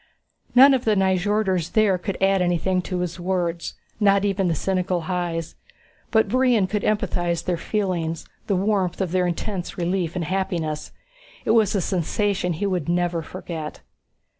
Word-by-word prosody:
None 270 +3 +9
of 255 -2 +1
the 215 -1 +2
Nyjorders 190 -2 +1
there 205 -4 +3
could 190 +2 -4
add 195 0 +3
anything 180 +1 +1
to 180 0 -3
his 180 0 -4
words, 175 -2 -2 0.2
not 200 -1 +4
even 195 -2 +1
the 165 - +1
cynical 185 +1 -1
Hys. 170 -1 -3 0.6
But 220 -1 +3
Brion 250 -5 +3
could 210 +2 -2
empathize 175 -5 0
their 180 - +1
feelings, 170 -4 -2 0.2
the 200 - +1
warmth 190 -2 0
of 190 -4 -1
their 180 0 +2
intense 180 +2 -4
relief 175 -1 -1
and 175 -2 -2
happiness. 170 -4 -2 0.5
It - - +2
was 220 -3 +3
a 195 - +2
sensation 185 +1 0
he 170 +6 -3
would 180 -6 -1
never 175 -1 +1
forget. 160 -2 -7
185 Hz, 160 wpm, -23 LUFS, 175-200 Hz, 0.6 s, None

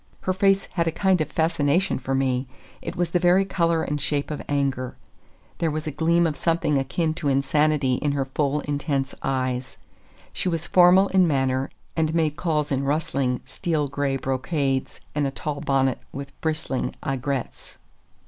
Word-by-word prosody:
Her 185 - 0
face 195 0 +3
had 170 -2 0
a - - +2
kind 190 -1 +2
of 155 - -1
fascination 160 +1 +1
for 135 0 -2
me; 130 -1 0 0.3
it 170 - -5
was 175 -2 -1
the 180 - +2
very 180 +2 +4
color 170 -3 +1
and 145 0 -2
shape 145 +2 -1
of 150 - -4
anger. 135 -3 -1 0.6
There 165 - +1
was 155 +1 -3
a 155 - -2
gleam 170 +3 +2
of 155 -3 0
something 165 -4 +1
akin 155 +4 -1
to 160 -2 -4
insanity 140 -1 +2
in 145 -1 +1
her 140 -1 0
full, 145 +2 0
intense 140 -2 -2
eyes. 130 -1 -2 0.6
She 185 - -1
was 165 -1 -2
formal 185 +2 +6
in 185 -2 +4
manner, 135 -2 +1 0.3
and 160 0 +1
made 155 -3 +1
calls 155 -4 -1
in 135 0 +1
rustling, 140 -3 0
steel 150 +2 -1
gray 140 0 -1
brocades 135 +1 -1
and 145 -1 +1
a - - 0
tall 145 +1 -4
bonnet 135 -2 +1
with 140 0 -7
bristling 155 -5 -2
aigrettes. 135 -1 -3
150 Hz, 170 wpm, -24 LUFS, 135-165 Hz, 0.6 s, formal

